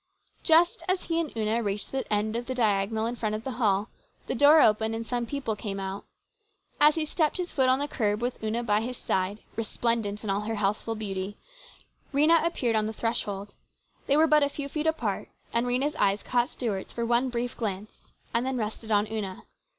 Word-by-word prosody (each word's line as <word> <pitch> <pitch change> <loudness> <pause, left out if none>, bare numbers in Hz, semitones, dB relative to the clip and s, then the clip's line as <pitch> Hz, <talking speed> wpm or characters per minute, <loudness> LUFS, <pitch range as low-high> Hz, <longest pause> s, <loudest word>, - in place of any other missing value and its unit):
Just 335 +1 +4
as 370 0 +1
he 330 0 0
and 325 -4 -2
Una 220 +1 +1
reached 205 -2 -3
the 270 -3 -3
end 210 +1 +1
of 240 +1 -3
the 260 - -3
diagonal 220 -1 +1
in 235 +1 -2
front 215 -3 -2
of 215 - -5
the 265 - -3
hall, 205 0 +2 0.4
the - - -2
door 290 +5 +7
opened 220 -2 +4
and 230 0 -4
some 240 0 -2
people 270 -4 -2
came 200 -1 -5
out. 195 +1 -5 0.7
And 295 - +8
as 300 - +4
he 320 -1 0
stepped 310 +1 +1
his 360 -1 -3
foot 260 -3 +3
on 260 - +4
the 285 +1 -1
curb 210 -6 0
with 240 -1 -3
Una 225 +2 -1
by 210 -2 +2
his 245 +2 -4
side, 190 +3 -1
resplendent 225 -2 -1
in 215 - -4
all 200 +1 0
her 220 +1 -3
healthful 210 +2 -1
beauty, 200 -2 -4 0.7
Rhena 310 +4 +4
appeared 255 -9 0
on 215 0 +2
the 220 - -4
threshold. 205 -3 -2 0.5
They 280 - +4
were 315 - +6
but 305 -1 +5
a 285 - +3
few 285 0 -5
feet 305 +2 -2
apart, 320 0 -1 0.2
and 235 +1 +2
Rhena's 265 +5 +1
eyes 200 -4 +1
caught 245 +1 +1
Stuart's 215 -10 -3
for 235 - -2
one 240 +2 +2
brief 245 0 -3
glance 210 -2 -3 0.4
and 235 - +2
then 260 0 -1
rested 220 0 -4
on 205 0 +4
Una. 210 -3 -4
230 Hz, 210 wpm, -27 LUFS, 210-265 Hz, 0.7 s, And